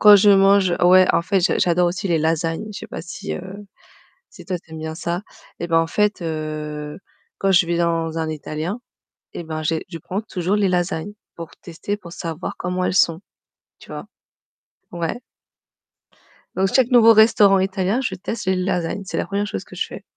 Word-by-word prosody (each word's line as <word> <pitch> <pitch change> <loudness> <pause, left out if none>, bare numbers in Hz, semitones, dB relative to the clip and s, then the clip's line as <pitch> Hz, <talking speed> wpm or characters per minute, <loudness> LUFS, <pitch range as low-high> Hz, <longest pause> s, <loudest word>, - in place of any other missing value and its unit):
quand 210 -1 +9
je 205 +1 +5
mange, 195 -2 +5
ouais, 185 +1 +7
en - - +2
fait, 190 +3 +1
j'a 175 - +1
j'adore 175 0 +3
aussi 190 +3 -3
les 170 -2 +2
lasagnes. 165 +4 -1
Je - - -7
sais - - -8
pas - - -7
si, 195 +3 -6
heu, 190 +3 -8 0.7
si, - - -14
toi, 185 -2 -2
tu 165 -1 -22
aimes 160 - -7
bien 160 0 -5
ça. 175 +1 -3 0.4
Eh, 170 - -3
bah, 165 -1 +3
en 165 - 0
fait, 210 +3 0
heu, 155 -2 -5 0.4
quand 195 - +1
je 175 -2 +5
vais 170 0 -1
dans 165 -1 0
un 160 -1 -2
italien, 155 - -4 0.5
eh, 175 - -6
ben, 155 -1 -5
j'ai 160 +1 -1
je 170 -2 -7
prends 185 +5 -4
toujours 195 -3 -2
les 205 -2 +2
lasagnes 180 +1 -1 0.2
pour 165 -1 -8
tester, 175 +4 -5
pour 175 -5 -12
savoir 165 -1 -5
comment 180 +1 -2
elles - - 0
sont, 170 -3 +3 0.6
tu - - -16
vois? - - -7 0.9
Ouais. 170 +5 -3 1.4
Donc 190 +1 +2
chaque 260 -1 +4
nouveau 230 -2 +7
restaurant 215 -3 +5
italien, 190 +4 0
je 195 - -2
teste 190 +4 -5
les 190 0 +2
lasagnes, 185 0 -2
c'est - - -5
la - - -1
1re 200 +1 -2
chose - - -5
que - - -13
je - - -1
fais. - - -10
180 Hz, 200 wpm, -21 LUFS, 165-195 Hz, 1.4 s, quand